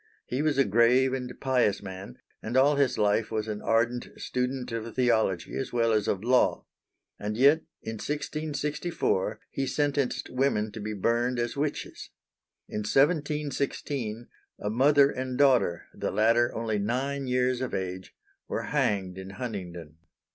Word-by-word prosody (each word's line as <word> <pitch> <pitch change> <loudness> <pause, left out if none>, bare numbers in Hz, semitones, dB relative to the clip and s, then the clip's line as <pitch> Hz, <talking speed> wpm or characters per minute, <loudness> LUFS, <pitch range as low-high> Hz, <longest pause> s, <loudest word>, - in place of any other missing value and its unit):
He 130 +3 -2
was 150 -2 +1
a 135 - +5
grave 120 +5 +4
and 125 -1 -3
pious 125 -7 +1
man, 95 -9 -8 0.2
and 120 +4 -2
all 140 +3 +5
his 140 -3 +2
life 105 +1 +2
was 110 -1 -2
an 105 -1 -4
ardent 115 +2 +1
student 125 0 -2
of 115 0 -5
theology 110 -8 +1
as 135 - -3
well 115 -1 +2
as 105 -2 +1
of 95 +1 -1
law. 125 +1 +2 0.5
And 105 +1 -3
yet 140 +5 +6 0.3
in 110 0 -5
1664 150 - -2
he 135 -1 -2
sentenced 140 0 -1
women 125 -5 +1
to 110 - -8
be 105 +1 -4
burned 120 +5 +1
as 120 0 -1
witches. 145 +1 -3 0.6
In - - -4
1716 140 -3 0 0.3
a 105 - -2
mother 140 +4 +5
and 130 -1 -4
daughter 125 -12 +3
the - - -3
latter 115 +2 +3
only 110 -2 -1
nine 135 +6 -1
years 125 0 +1
of 130 -5 -2
age 95 -1 -5 0.3
were - - -2
hanged 95 -2 0
in 95 0 -8
Huntingdon. 90 -8 -6
120 Hz, 150 wpm, -28 LUFS, 105-135 Hz, 0.6 s, yet